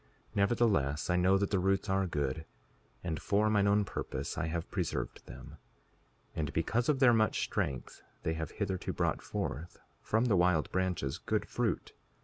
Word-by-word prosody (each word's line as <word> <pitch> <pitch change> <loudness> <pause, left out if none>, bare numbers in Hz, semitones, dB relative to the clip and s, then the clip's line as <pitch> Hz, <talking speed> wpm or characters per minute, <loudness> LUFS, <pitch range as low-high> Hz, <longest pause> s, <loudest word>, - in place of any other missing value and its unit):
5:36 - - -27
Nevertheless, 100 - +2
I - - +3
know 90 +2 +4
that 100 0 -1
the 100 - +2
roots 95 +2 +1
are 95 -1 +1
good, 75 0 -2 0.6
and 80 -3 -3
for 105 +4 +2
mine 100 -1 +3
own 100 0 +3
purpose - - -4
I - - -1
have 85 +2 -3
preserved 90 -4 -2
them; - - -10 0.8
and 75 -3 -1
because 115 - +1
of 150 - +4
their 130 -2 +6
much 110 -1 +2
strength 65 -3 -3 0.2
they 80 - 0
have 80 -2 -3
hitherto 95 -3 -3
brought - - 0
forth, 85 +6 -4 0.2
from 110 +3 +1
the 115 -5 +3
wild 90 -3 +3
branches, 90 -7 -1
good - - -1
fruit. - - -1
95 Hz, 170 wpm, -32 LUFS, 80-105 Hz, 0.8 s, their